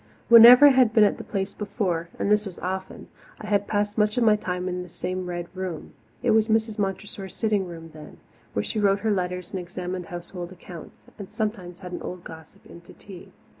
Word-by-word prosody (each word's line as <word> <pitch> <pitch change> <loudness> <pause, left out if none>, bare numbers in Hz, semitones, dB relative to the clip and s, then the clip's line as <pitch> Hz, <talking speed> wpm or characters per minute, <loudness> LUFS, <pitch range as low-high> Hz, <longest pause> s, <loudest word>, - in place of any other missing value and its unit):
Whenever 235 +4 +10
I - - +10
had 255 -4 +4
been 220 - +6
at 205 - +2
the - - -6
Place 195 -1 -3
before 185 -5 -3
and 200 - -1
this 210 0 +3
was 185 - -9
often 190 +1 -5 0.3
I - - -8
had 205 -1 0
passed 205 +1 -1
much 210 +1 +1
of 245 - +3
my 215 -2 +5
time 180 -3 -4
in 180 0 -3
this 180 -2 -11
same 185 0 -4
Red 175 -1 -5
Room. 185 -4 -6 0.3
It 245 - +3
was 220 0 +3
Mrs. 220 -1 0
Montressor's 195 -1 -4
sitting 210 -4 0
room 165 -2 -10
then, 155 -1 -12 0.4
where 100 - -1
she 215 - -3
wrote 200 -1 +2
her 220 0 0
letters 180 -2 -3
and 190 - -3
examined 180 0 -6
household 175 0 -7
accounts, 175 -2 -12
and 200 - -8
sometimes 195 -5 -4
had 180 -2 -8
an 175 - -6
old 180 -1 -7
gossip 160 -1 -13
in 170 - -13
to 170 - -16
tea. 190 -3 -13
190 Hz, 215 wpm, -25 LUFS, 180-210 Hz, 0.4 s, Whenever